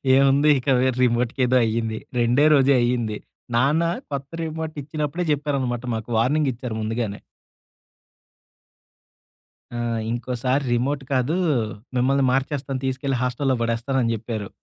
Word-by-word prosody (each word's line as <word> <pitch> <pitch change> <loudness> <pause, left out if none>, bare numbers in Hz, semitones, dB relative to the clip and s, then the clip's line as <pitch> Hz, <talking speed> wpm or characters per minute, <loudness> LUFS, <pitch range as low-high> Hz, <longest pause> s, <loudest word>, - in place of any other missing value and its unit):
ఏముంది 140 +2 +4
ఇక 125 - -12
వె 130 +1 +3
రిమోట్కేదో 125 +1 +2
అయింది. 110 0 -1 0.2
రెండే 120 +5 +3
రోజే 140 -1 +5
అయింది. 120 -3 0 0.4
నాన్న 140 +7 +3 0.3
కొత్త 140 -1 -4
రిమోట్ 160 0 -4
ఇచ్చినప్పుడే 155 +3 -3
జెప్పారనమాట 135 -5 -1
మాకు 110 +1 -6
వార్నింగ్ 140 +5 +2
ఇచ్చారు 120 -1 -6
ముందుగానే. 110 -1 -2 2.6
ఆ! - - -3 0.3
ఇంకోసారి 125 +3 -1
రిమోట్ 135 +4 0
కాదు. 130 +6 +1 0.6
మిమ్మల్ని 135 +2 +2
మార్చేస్తాను, 135 0 -1
తీసుకెళ్లి 130 0 -1
హాస్టల్‌లో 125 +1 0
పడేస్తానని 115 +1 0
చెప్పారు. 110 -2 -5
130 Hz, 110 wpm, -23 LUFS, 120-140 Hz, 2.6 s, రోజే